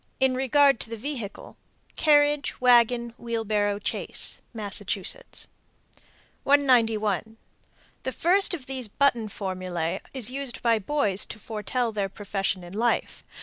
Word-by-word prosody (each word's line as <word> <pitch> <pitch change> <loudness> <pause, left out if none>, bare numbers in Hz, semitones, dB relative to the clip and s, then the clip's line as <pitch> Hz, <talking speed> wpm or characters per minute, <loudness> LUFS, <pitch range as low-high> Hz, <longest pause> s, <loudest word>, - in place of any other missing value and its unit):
In 265 -1 +3
regard 270 0 +3
to - - -5
the 230 - -5
vehicle: 235 -4 -6 0.4
Carriage, 290 -1 +3
wagon, 240 -1 +4
wheelbarrow, 215 -3 -1
chaise. - - -1
Massachusetts. 205 - -2 1.0
191. 225 -6 +2 0.6
The 260 - -3
first 360 +7 +4
of 280 -7 -10
these 260 -3 -3
button 240 -1 +1
formulæ 185 -3 -3
is 250 -3 -1
used 270 -2 -4
by 230 -2 +3
boys 210 -4 0
to - - -8
foretell 225 +3 -2
their 200 -2 -2
profession 195 -2 -3
in 175 +1 -10
life. 235 +3 -1
230 Hz, 120 wpm, -26 LUFS, 205-265 Hz, 1.0 s, wagon